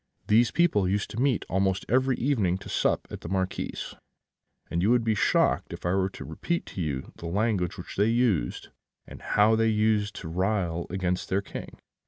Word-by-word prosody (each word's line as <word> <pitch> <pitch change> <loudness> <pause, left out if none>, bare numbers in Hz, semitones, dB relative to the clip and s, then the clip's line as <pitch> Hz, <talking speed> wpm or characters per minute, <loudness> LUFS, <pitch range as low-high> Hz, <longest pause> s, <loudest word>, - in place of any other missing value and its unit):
These 115 +3 +4
people 105 - +2
used 100 +1 -1
to 115 - -3
meet 135 -4 +1
almost 95 +1 0
every 130 +2 +2
evening 110 -9 +1
to 95 - -11
sup - - 0
at - - -7
the 80 - -7
Marquis's; 95 -1 -3 0.8
and 85 - 0
you 100 - +2
would 120 -1 +4
be 110 -1 +2
shocked 105 - +2
if - - -8
I 90 - +1
were 95 0 +1
to - - -9
repeat 170 - -3
to 95 - -4
you 70 -5 -3
the 85 - -7
language 95 -1 0
which - - -9
they 100 +2 +4
used, 115 - 0 0.4
and - - -11
how 105 +2 +3
they 115 0 +3
used 105 -1 +1
to 85 - -7
rail 90 -1 -1
against 90 -1 -2
their 100 +1 +1
King. - - -8
100 Hz, 195 wpm, -27 LUFS, 90-110 Hz, 0.8 s, These